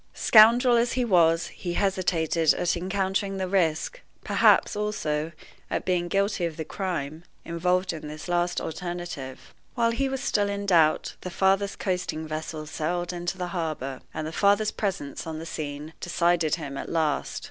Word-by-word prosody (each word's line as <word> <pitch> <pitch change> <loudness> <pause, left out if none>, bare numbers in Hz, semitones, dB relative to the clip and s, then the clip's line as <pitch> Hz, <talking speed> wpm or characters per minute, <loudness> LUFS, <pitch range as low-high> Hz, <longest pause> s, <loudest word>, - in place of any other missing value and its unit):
Scoundrel 235 +3 +6
as 235 +1 +1
he 250 -1 +1
was, 170 -5 +4
he 175 -2 -5
hesitated 175 -4 +1
at 175 - 0
encountering 195 +2 -1
the 190 -1 -2
risk 185 - 0 0.2
perhaps, - - +4
also, 165 -7 -2 0.4
at - - -2
being 180 -2 +1
guilty 195 +1 0
of 165 -2 -2
the 160 - -4
crime 165 -4 -4 0.2
involved 180 +2 0
in 155 -2 -7
this 155 +3 -8
last 175 0 0
alternative. 175 -5 -6 0.2
While 230 -2 +2
he 270 +4 0
was 270 0 -3
still 205 -1 +1
in 200 0 -3
doubt, 165 -5 +3
the 180 - -5
father's 195 +2 +1
coasting 180 -4 -2
vessel 155 0 -5
sailed 175 +3 -2
into 175 +2 -3
the 180 -1 -3
harbor, 155 -7 -4
and 155 - -4
the 155 - -4
father's 205 +4 +3
presence 180 -8 -4
on 160 -1 -4
the 160 - -6
scene 150 -1 -6
decided 170 -2 +1
him 140 -4 -6
at - - -6
last. 160 -3 -1
175 Hz, 165 wpm, -26 LUFS, 160-195 Hz, 0.4 s, Scoundrel